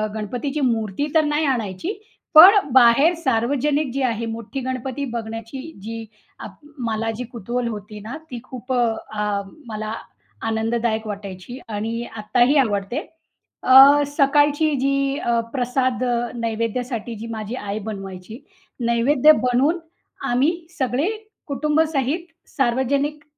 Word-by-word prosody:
गणपतीची 245 +7 -3
मूर्ती 230 +1 0
तर 315 - +5
नाही 295 +1 +1
आणायची. 245 - -2 0.4
पण 345 +5 +11 0.2
बाहेर 260 +6 +6
सार्वजनिक 275 +3 +1
जी 275 - -2
आहे 230 -2 -1
मोठी 230 +2 -5
गणपती 260 +2 -3
बघण्याची 225 +2 -5 0.2
जी 225 +2 -6 0.3
आप - - -9 0.3
मला 225 0 -1
जी 250 - -3
कुतूहल 240 +2 -3
होती 210 -1 -7
ना, 230 +8 -7
ती 245 - -5
खूप 255 0 -6
अ, 245 -1 +3 0.3
अ, 210 -1 -1 0.3
मला 215 -1 -4 0.5
आनंददायक 225 0 -1
वाटायची 200 +3 -7
आणि 225 +2 -3
आत्ताही 245 +6 +2
आवडते. 220 -1 +1 0.6
अ, 275 +3 +8
सकाळची 290 +2 +3
जी 275 +1 +1
अ, 235 -1 0
प्रसाद 255 -1 0 0.3
नैवेद्यासाठी 230 +1 -3
जी 220 +2 -7
माझी 220 +1 -5
आई 205 -3 -4
बनवायची, 195 +2 -8 0.5
नैवेद्य 250 +6 +5
बनवून 260 +7 +2 0.5
आम्ही 260 +6 +3 0.3
सगळे 260 +4 0 0.4
कुटुंबासहित 300 +1 0 0.2
सार्वजनिक 275 +3 0
245 Hz, 120 wpm, -22 LUFS, 225-275 Hz, 0.6 s, पण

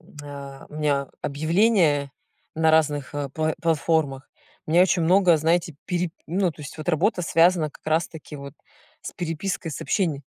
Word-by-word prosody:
м, - - -20
а, 140 -1 -9
у - - -13
меня 145 -3 0
объявления 155 -1 +2 0.4
на 160 0 +3
разных, 145 -3 +1
э, 145 -1 -2
пла 155 0 0
платформах, 155 -4 0 0.4
у - - -6
меня 175 +2 +6
очень 180 -2 +2
много, 180 0 +5
знаете, 165 +1 +1
пери 180 -2 -1 0.2
ну, 185 +1 +1
то 150 - -12
есть 145 - -9
вот 155 - -6
работа 180 +3 +1
связана 165 -1 +3
как - - -20
раз-таки 160 -1 -2
вот 140 -1 -9 0.5
с - - -7
перепиской 170 0 -3
сообщений. 150 -1 -1
160 Hz, 160 wpm, -24 LUFS, 145-175 Hz, 0.5 s, меня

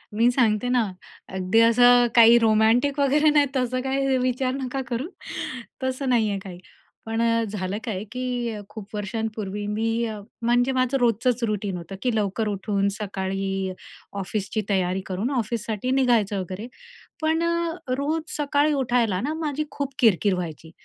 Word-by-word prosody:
मी 230 +3 +4
सांगते 235 -2 +2
ना. 250 -1 +3 0.5
अगदी 185 +4 +2
असं 245 +1 +6
काही 235 0 +8
रोमॅन्टिक 225 +6 +3
वगैरे 290 +2 +4
नाही 295 -1 +4
तसं 255 -1 0
काही 270 0 +1
विचार 255 0 0
नका 270 0 -3
करू. 245 +4 -3 0.8
तसं 260 +1 -1
नाहीये 220 -5 +2
काही. 180 -3 -9 0.5
पण 225 +1 -1
अ, 230 0 +2
झालं 200 -1 -3
काय 205 -5 -3
की 245 -2 -2
खूप 210 -1 -9
वर्षांपूर्वी 210 -1 -3
मी 225 +2 0 0.4
म्हणजे 245 +2 +2
माझं 255 +1 +1
रोजचंच 240 +1 +1
रूटीन 205 -4 -1
होतं 175 +3 -8
की 250 -3 0
लवकर 215 +1 0
उठून 200 0 0
सकाळी 195 -2 -3 0.5
ऑफिसची 205 +3 -2
तयारी 190 -1 +1
करून 195 +6 -2
ऑफिससाठी 230 -1 -2
निघायचं 235 -7 +2
वगैरे. 185 +4 -5 0.5
पण 320 +1 +1
अ, 335 0 0 0.2
रोज 305 +4 -1 0.2
सकाळी 295 0 +2
उठायला 240 -8 +1
ना, 290 +5 -2
माझी 305 -2 -2
खूप 280 -1 -4
किरकिर 210 - +4
व्हायची, 165 -2 -6
230 Hz, 145 wpm, -24 LUFS, 205-255 Hz, 0.8 s, काही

